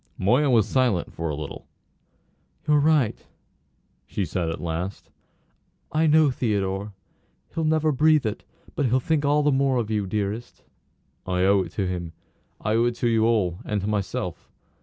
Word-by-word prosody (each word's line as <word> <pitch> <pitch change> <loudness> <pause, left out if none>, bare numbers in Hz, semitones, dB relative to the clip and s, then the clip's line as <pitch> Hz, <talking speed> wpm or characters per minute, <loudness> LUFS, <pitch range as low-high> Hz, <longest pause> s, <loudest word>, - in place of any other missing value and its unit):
Moya 125 +9 +3
was 115 -5 +4
silent 125 -9 +1
for 85 0 -3
a 75 - -2
little. 75 -1 -7 1.0
"You're 150 0 +4
right," 145 -6 +2 0.8
she 100 - -2
said 85 0 -2
at 80 - -4
last. 85 +3 -4 0.8
"I 160 +1 +2
know 155 -2 +5
Theodore. 100 -4 -2 0.6
He'll 165 -1 -1
never 155 0 +2
breathe 150 0 +3
it; 110 0 -3 0.3
but 145 - 0
he'll 125 +2 +2
think 150 +2 0
all 145 +1 +3
the 145 - +3
more 135 -1 +2
of 110 -2 -2
you, 105 -2 0
dearest." 105 +4 -4 0.6
"I 90 0 +1
owe 100 +1 +4
it 85 -3 -6
to 100 - -1
him. 90 -3 -4 0.5
I 110 - -1
owe 115 +1 +3
it 120 -1 0
to 120 - -1
you 115 -1 +3
all, 100 -7 +1
and 105 - -2
to - - -4
myself. 105 -3 -3
110 Hz, 170 wpm, -24 LUFS, 95-140 Hz, 1.0 s, know